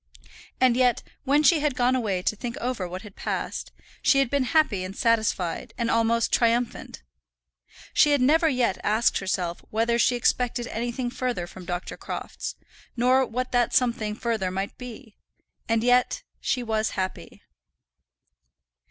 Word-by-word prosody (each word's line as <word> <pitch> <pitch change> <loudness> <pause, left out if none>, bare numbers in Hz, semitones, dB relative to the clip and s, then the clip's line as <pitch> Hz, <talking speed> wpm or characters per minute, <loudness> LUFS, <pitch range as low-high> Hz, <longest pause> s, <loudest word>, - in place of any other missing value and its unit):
And 255 -2 +4
yet, 250 -1 +2 0.2
when 285 +3 +3
she 320 +1 +5
had 295 -3 0
gone 250 +1 +2
away 200 -7 -1
to 215 - 0
think 240 +4 -5
over 245 -8 -2
what 185 +3 -7
had 210 -3 -12
passed, - - -4 0.3
she 290 -1 +4
had 275 -3 +2
been 280 -2 +1
happy 250 - +2
and 185 +2 -7
satisfied, 225 -2 0
and 235 -1 0
almost 230 0 +2
triumphant. 235 - 0 0.9
She 300 - +5
had 290 -1 +3
never 315 +6 +4
yet 250 -7 +1
asked 220 +3 +2
herself 180 -3 -2
whether 230 +2 +1
she 245 - +3
expected 240 0 0
anything 240 +2 -3
further 245 -8 -2
from 180 +1 -11
Dr. 175 +1 -4
Crofts, - - -6 0.4
nor 255 +2 +4
what 255 +2 -3
that 245 -2 +2
something 230 -4 +1
further 220 -5 -1
might 195 +2 -4
be, 245 -2 -10 0.5
and 225 0 +2
yet 250 - +2 0.2
she 250 - -1
was 220 -1 0
happy! 185 0 -5
235 Hz, 150 wpm, -25 LUFS, 215-255 Hz, 0.9 s, she